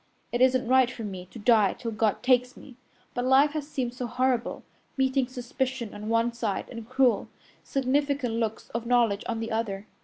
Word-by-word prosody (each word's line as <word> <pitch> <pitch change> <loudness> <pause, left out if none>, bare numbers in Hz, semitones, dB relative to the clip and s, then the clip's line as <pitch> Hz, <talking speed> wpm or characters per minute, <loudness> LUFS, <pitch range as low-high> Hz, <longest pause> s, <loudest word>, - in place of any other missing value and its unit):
It 240 - -1
isn't 255 -1 +4
right 260 0 +5
for 245 -2 -7
me 185 -3 -6
to 190 - -12
die 215 -3 +4
till 235 -2 -5
God 220 0 0
takes 250 0 +2
me, 260 - -13 0.4
but 245 - -2
life 265 +3 +5
has 300 -1 -4
seemed 255 -5 -3
so 250 0 -4
horrible, 245 0 0 0.3
meeting 265 -1 +2
suspicion 255 -2 -3
on 210 +1 -6
one 230 +1 +2
side 225 -4 -2
and 230 -2 -8
cruel, 255 -4 +2 0.3
significant 275 -1 0
looks 225 -1 -3
of 235 0 -4
knowledge 235 -4 +2
on 230 -1 -1
the 225 0 -4
other. 210 -3 -2
245 Hz, 185 wpm, -27 LUFS, 225-260 Hz, 0.4 s, right